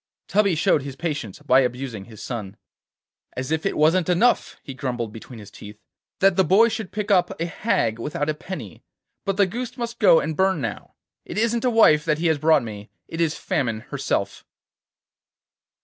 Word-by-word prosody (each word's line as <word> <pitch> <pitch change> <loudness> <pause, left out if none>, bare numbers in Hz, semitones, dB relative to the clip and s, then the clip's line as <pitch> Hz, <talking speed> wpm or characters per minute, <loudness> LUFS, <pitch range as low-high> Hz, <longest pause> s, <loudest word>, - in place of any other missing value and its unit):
Tubby 200 -3 +2
showed 150 -1 +2
his 135 -1 -7
patience 145 - -4
by 130 +1 +5
abusing 125 -5 -2
his 110 -2 -12
son. 105 -5 -6 0.8
'As 130 +3 -4
if 160 +4 0
it - - -3
wasn't 165 +3 +3
enough,' 215 +8 +2
he 135 - -7
grumbled 120 -4 -4
between 115 +2 -10
his 105 -2 -12
teeth, 105 0 -11 0.4
'that 195 -1 +4
the 190 - +5
boy 200 +7 +5
should 220 -4 -5
pick 210 0 -3
up 180 -4 +2
a 165 - 0
hag 165 - -1
without 145 +4 -3
a 155 - +1
penny, 150 - -8 0.4
but 195 -1 -1
the 200 - +5
goose 245 +6 -5
must 235 -1 -5
go 200 -6 +6
and 155 0 -3
burn 190 -1 +2
now. 115 -6 -5 0.3
It - - -8
isn't 230 +2 +1
a - - +4
wife 165 -10 +5
he 155 +2 0
has 160 -3 +2
brought 155 -2 +4
me, 105 -1 -8 0.2
it 165 - -4
is 160 -2 0
Famine 115 -5 -2
herself. 135 -8 -2
155 Hz, 185 wpm, -23 LUFS, 125-195 Hz, 0.8 s, go